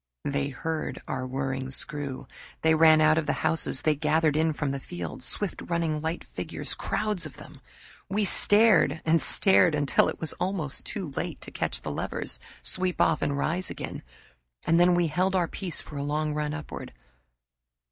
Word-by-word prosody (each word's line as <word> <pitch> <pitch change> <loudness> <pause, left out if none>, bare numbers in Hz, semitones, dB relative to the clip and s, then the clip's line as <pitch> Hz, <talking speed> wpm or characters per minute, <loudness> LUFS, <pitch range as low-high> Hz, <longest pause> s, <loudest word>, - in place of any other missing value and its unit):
They 140 0 -1
heard 160 +4 -4
our 130 0 -3
whirring 130 0 -3
screw. 140 0 -3 0.4
They 160 0 +5
ran 160 0 +6
out 155 +1 +5
of 155 - -4
the 145 - +2
houses 160 -4 +4
they 155 - +3
gathered 155 +1 +1
in 160 +1 +2
from 145 -2 -2
the 140 - -3
fields, 85 - -6
swift 205 -3 -2
running 165 -3 -1
light 160 +2 -3
figures, - - -4
crowds 210 -6 -1
of 150 - -15
them. - - -13 0.5
We 205 +2 +1
stared 205 -8 +5
and 165 0 +3
stared 180 -4 +4
until 145 -2 +2
it - - -6
was 160 - -3
almost 180 -7 -3
too 190 -7 -4
late 140 - -4
to - - -9
catch - - -3
the - - -4
levers, - - -4 0.2
sweep 185 -1 -2
off 160 -1 +3
and 140 -1 0
rise 175 +6 -1
again; - - -6 0.6
and 165 +1 +3
then 175 0 +5
we 175 0 +2
held 180 +5 0
our 175 -2 +2
peace 180 0 -1
for 150 - -10
a 140 - -2
long 150 +1 -1
run 150 0 -2
upward. 155 - -8
155 Hz, 180 wpm, -27 LUFS, 145-175 Hz, 0.6 s, ran